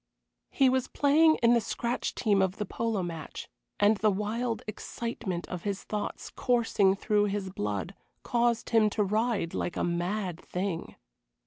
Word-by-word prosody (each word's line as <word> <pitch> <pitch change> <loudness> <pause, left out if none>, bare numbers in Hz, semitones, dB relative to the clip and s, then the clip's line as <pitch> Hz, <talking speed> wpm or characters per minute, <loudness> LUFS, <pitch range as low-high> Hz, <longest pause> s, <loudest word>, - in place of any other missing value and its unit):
He 270 - +3
was 260 0 +2
playing 315 +3 +4
in 235 +1 +6
the 235 - +4
scratch 235 +3 -2
team 205 -4 +2
of 190 +1 0
the 210 - -2
polo 220 -1 -1
match, 165 -3 -6 0.3
and 205 +1 +5
the 215 +1 +3
wild 220 +4 -2
excitement 215 -4 -4
of 180 -2 -5
his 200 0 -3
thoughts, 210 -1 -4
coursing 225 -5 +2
through 205 0 +2
his 200 -2 -2
blood, 105 - -3 0.3
caused 235 -1 +1
him 220 -2 +5
to 210 - +4
ride 215 -3 0
like 175 - -2
a - - 0
mad 175 +1 -2
thing. 180 -2 -4
210 Hz, 155 wpm, -29 LUFS, 190-235 Hz, 0.3 s, in